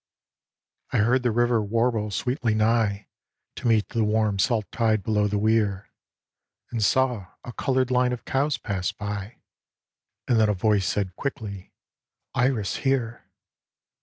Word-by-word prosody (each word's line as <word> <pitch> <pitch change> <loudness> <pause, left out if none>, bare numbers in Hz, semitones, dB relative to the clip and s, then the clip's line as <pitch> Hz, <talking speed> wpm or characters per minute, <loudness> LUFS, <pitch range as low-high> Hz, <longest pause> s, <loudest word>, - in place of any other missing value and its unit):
I - - 0
heard 120 +5 +3
the 125 - +1
river 120 0 +2
warble 110 0 0
sweetly 120 - -1
nigh 110 -2 +1 0.5
To - - -3
meet 110 -3 +2
the 115 - 0
warm 105 -2 +1
salt 110 0 +1
tide 110 -3 +1
below 105 0 +1
the 105 0 -1
weir, 105 -2 +1 0.8
And 115 -3 -1
saw 120 -2 +1 0.2
a 120 - -8
coloured 130 0 0
line 125 0 +3
of 125 - -5
cows 140 +2 0
pass 95 -2 -2
by, 105 +2 -6 0.4
— - - -65
And 120 -3 +3
then 110 -1 +4
a 105 - +1
voice 100 0 +1
said 95 -3 -1
quickly, 105 -8 -5 0.3
" - - -62
Iris 120 -8 0
here 125 -4 -1
110 Hz, 150 wpm, -25 LUFS, 105-120 Hz, 0.8 s, then